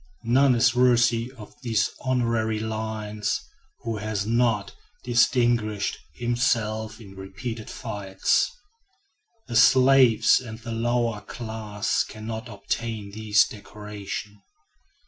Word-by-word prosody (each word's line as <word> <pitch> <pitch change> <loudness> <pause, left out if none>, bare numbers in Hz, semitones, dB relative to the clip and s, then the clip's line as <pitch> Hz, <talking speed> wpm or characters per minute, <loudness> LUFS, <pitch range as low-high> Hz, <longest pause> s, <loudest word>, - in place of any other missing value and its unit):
None 130 +3 +4
is 120 +1 +4
worthy 120 -1 +3
of 105 -2 -11
these 110 -5 +1
honorary 115 -4 0
lines, 110 -1 -3 0.4
who 115 -2 -3
has 105 -1 -2
not 115 -2 +1 0.3
distinguished 120 -4 +2 0.2
himself 110 -3 -1
in 100 -4 -13
repeated 105 +4 -7
fights. 100 -5 0 1.0
The 120 - -6
slaves 130 -1 +6
and 110 -3 -8
the 120 0 -8
lower 115 -1 0
class 110 -3 -2
can 110 0 -10
not 115 +2 -5
obtain 110 0 -4
this 105 0 +3
decoration. 105 -1 -8
110 Hz, 105 wpm, -25 LUFS, 105-120 Hz, 1.0 s, slaves